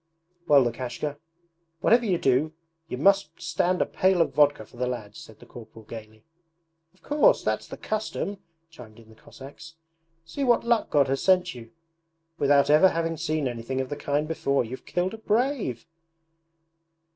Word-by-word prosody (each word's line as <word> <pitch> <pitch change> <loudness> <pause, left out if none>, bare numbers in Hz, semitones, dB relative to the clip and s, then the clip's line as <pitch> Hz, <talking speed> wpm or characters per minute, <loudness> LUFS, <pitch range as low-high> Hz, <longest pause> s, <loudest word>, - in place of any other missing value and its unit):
'Well, 140 -2 +6
Lukashka, 125 +4 -4 0.6
whatever 235 +1 +4
you 185 -3 +2
do 140 +2 +1 0.3
you 125 - -5
must 180 +1 +2
stand 175 +2 0
a - - -5
pail 185 -1 +1
of 165 - +2
vodka 145 -7 +3
for 120 - -19
the 125 +1 -1
lads,' 110 -5 -6
said 110 - -13
the - - -15
corporal 110 -2 -13
gaily. 110 0 -11 0.7
'Of - - -31
course! 305 +13 +3
That's - - -2
the - - -9
custom,' 210 -2 -4 0.3
chimed 120 -8 -14
in 115 -1 -17
the 110 - -17
Cossacks. 145 +8 -13 0.5
'See 275 - -4
what 240 -3 +3
luck 235 -1 +1
God 145 -2 +3
has 135 +1 -1
sent 185 -2 +3
you! 115 -2 -11 0.7
Without 140 0 +4
ever 155 +5 +6
having 165 -1 -2
seen 155 -3 -2
anything 120 +2 -4
of 130 -1 -3
the 145 - -3
kind 145 +1 -1
before, 140 -5 0
you've 130 +3 -9
killed 180 +2 -1
a 225 - -8
brave!' 220 - -1
145 Hz, 170 wpm, -26 LUFS, 125-185 Hz, 0.7 s, Well